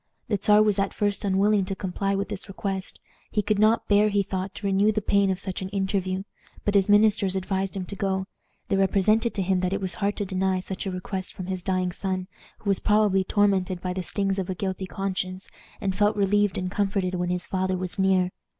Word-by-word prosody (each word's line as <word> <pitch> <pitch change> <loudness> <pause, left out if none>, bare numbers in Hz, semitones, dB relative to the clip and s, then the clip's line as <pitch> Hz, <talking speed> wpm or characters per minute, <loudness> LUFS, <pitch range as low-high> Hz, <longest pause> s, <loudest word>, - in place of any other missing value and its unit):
The 205 -3 +1
Czar 210 +1 +6
was 210 -2 +2
at 195 0 -1
first 205 0 0
unwilling 200 +1 +3
to 195 0 -3
comply 195 +1 -2
with 200 0 -2
this 190 - -5
request. 195 -1 -4 0.3
He 210 - 0
could 205 0 +1
not 215 +2 +3
bear, 205 +1 +4
he 200 -1 +2
thought, 190 0 -4
to 200 - -7
renew 200 +2 +3
the 215 - 0
pain 200 -1 +2
of 190 -1 -1
such 190 -1 -4
an 190 - -4
interview. 190 -1 -1 0.4
But 205 - +1
his 200 -1 +3
ministers 205 -2 +4
advised 190 +1 -2
him 185 - -3
to 200 - -7
go. 190 -1 -1 0.4
They 195 - +2
represented 215 +4 +2
to 195 - 0
him 185 0 +1
that 180 +1 0
it 195 - 0
was 190 -1 -3
hard 200 +1 0
to 205 - -1
deny 190 0 0
such 190 +1 -5
a - - -2
request 185 +1 -5
from 185 - -6
his 185 0 -3
dying 185 -1 0
son, 185 0 -3 0.3
who 205 - -4
was 195 - +1
probably 210 -2 +3
tormented 190 -2 +1
by 180 0 -3
the 185 - -3
stings 195 +1 -1
of 185 - -3
a 185 - -2
guilty 190 0 -3
conscience, 185 -1 -4 0.3
and 190 -2 -1
felt 205 +2 +3
relieved 205 0 +2
and 185 0 -2
comforted 195 -2 0
when 175 -1 -1
his 180 0 -1
father 185 0 -1
was 185 +1 -5
near. 190 -1 +3
195 Hz, 225 wpm, -25 LUFS, 185-205 Hz, 0.4 s, Czar